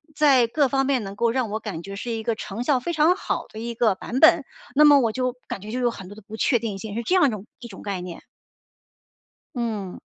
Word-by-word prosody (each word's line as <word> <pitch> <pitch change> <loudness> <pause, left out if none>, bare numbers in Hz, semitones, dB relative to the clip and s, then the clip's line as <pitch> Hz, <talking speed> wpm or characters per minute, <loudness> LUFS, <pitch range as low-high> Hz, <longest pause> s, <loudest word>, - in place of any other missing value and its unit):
在 270 -6 +5
各 285 +4 +2
方 270 +1 +1
面 265 -4 +1
能 195 0 -7
够 230 +2 +1
让 245 -3 -1
我 215 +1 -3
感 195 -8 -6
觉 195 +2 -7
是 235 +4 -5
一 225 -1 -3
个 230 0 0
成 215 +2 -5
效 265 0 +2
非 300 +8 -3
常 320 +3 +4
好 - - -3
的 215 - -10
一 235 +1 -4
个 220 -4 +2
版 240 +6 -4
本。 315 - +6 0.3
那 300 - +6
么 290 -1 +8
我 230 -3 +1
就 255 +1 -2
感 195 - -5
觉 215 +1 -8
就 250 - -2
有 245 -1 +1
很 195 -5 -10
多 205 - -11
的 215 - -13
不 215 +2 -10
确 240 -1 +2
定 210 -4 -4
性， 205 +1 -7
是 235 - -2
这 360 - +1
样 370 - +5
一 - - +2
种 210 -3 -6
一 240 - -9
种 - - -11
概 195 -3 -4
念。 180 -1 -8 1.3
嗯。 220 -6 -4
235 Hz, 285 characters per minute, -24 LUFS, 210-260 Hz, 1.3 s, 么